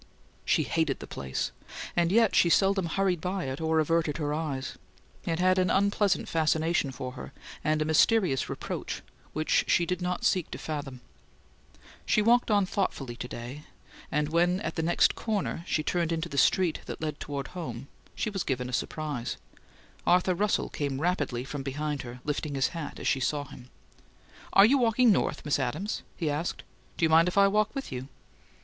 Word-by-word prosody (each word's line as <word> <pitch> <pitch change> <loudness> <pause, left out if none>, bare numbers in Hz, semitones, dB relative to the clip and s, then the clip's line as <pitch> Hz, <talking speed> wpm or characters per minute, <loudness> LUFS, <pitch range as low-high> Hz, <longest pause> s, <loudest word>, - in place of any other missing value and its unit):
She - - +3
hated - - 0
the - - -8
place, 65 -1 -3 0.4
and 170 0 +2
yet 225 0 +4
she 170 - +5
seldom 195 0 +3
hurried 180 -1 0
by 185 +1 -2
it 135 +3 -4
or 160 0 +2
averted 160 -1 +1
her 150 -2 -1
eyes. 150 -4 -3 0.5
It 165 -1 0
had 185 +1 +3
an 185 -1 +2
unpleasant 200 0 +2
fascination 160 -1 +1
for 130 0 -6
her, 130 +1 -9 0.3
and 155 0 +2
a - - -4
mysterious 160 - +3
reproach, - - -5 0.3
which 155 +1 +2
she 170 - +3
did 180 +1 -2
not 180 0 -2
seek 185 -4 +2
to - - -6
fathom. 145 -4 -5 1.0
She - - +2
walked 235 +3 +4
on 205 -2 +4
thoughtfully 150 -10 -2
to 125 - -5
day; 125 +6 -8 0.5
and 150 0 0
when, 175 +3 +2
at - - -3
the 160 - -2
next 170 +2 +3
corner, 205 -6 -2
she 155 - 0
turned 170 0 0
into 165 0 -2
the 140 - -7
street 180 -4 +3
that - - -6
led 155 -2 -3
toward 140 -2 -5
home, 160 -7 -6 0.3
she 215 - -2
was 195 -2 -2
given 125 -2 -2
a - - -7
surprise. 145 -2 -3 0.7
Arthur 180 +1 +4
Russell 205 +3 0
came 140 -2 -3
rapidly 145 -8 0
from 140 +1 -5
behind 145 +1 -3
her, 125 0 -9
lifting 150 0 -2
his 135 0 +2
hat 165 -3 -6
as - - -3
she 135 - +2
saw 145 +3 0
him. 125 -2 -13 0.8
"Are 195 - +8
you 270 +5 +4
walking 235 0 +4
north, 195 - 0
Miss 145 - +1
Adams?" 195 - -2 0.2
he 165 - -2
asked. 150 +4 -2 0.3
"Do 165 - +3
you - - +2
mind 165 +2 +6
if 180 - -2
I 200 0 +7
walk 215 +4 +1
with 275 - -5
you?" 130 0 -5
160 Hz, 185 wpm, -28 LUFS, 145-185 Hz, 1.0 s, Are